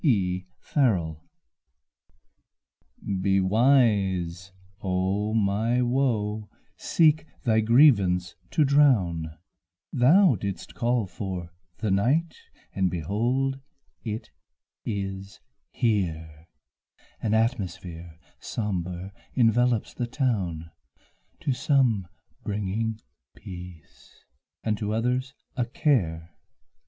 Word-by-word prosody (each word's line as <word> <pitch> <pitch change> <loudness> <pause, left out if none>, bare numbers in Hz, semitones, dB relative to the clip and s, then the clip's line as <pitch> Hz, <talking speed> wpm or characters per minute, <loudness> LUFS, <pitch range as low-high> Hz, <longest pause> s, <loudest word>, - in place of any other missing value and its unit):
Meditation 95 - 0 2.0
Be 95 0 +3
wise, 95 -5 +2 0.3
O 95 +3 0
my 110 +4 +2
Woe, 110 -5 0 0.3
seek 155 -1 +2 0.2
thy 110 -2 +3
grievance 105 -7 +4 0.2
to 155 - +3
drown, 95 - +3 0.6
Thou 145 - +5
didst 100 -1 -5
call 120 -2 +1
for 90 -3 -6 0.3
the 110 -3 -1
night, 140 - +2 0.4
and 95 -1 +1
behold 120 - -1 0.4
it 110 -1 -5 0.5
is 95 -2 -4 0.3
here, 80 -8 -2 0.7
An 110 -1 +1
atmosphere 90 -8 -2 0.2
sombre, 95 -3 -4 0.2
envelopes 120 -1 +2
the 120 - -3
town, 95 - -2 0.7
To 140 - 0
some 125 - +2 0.4
bringing 105 +2 -2 0.4
peace 90 -3 -12 0.4
and 105 -2 -1
to 105 0 -1
others 125 +3 -1 0.2
a 125 -3 0
care. 85 - 0
105 Hz, 85 wpm, -26 LUFS, 90-125 Hz, 2.0 s, Thou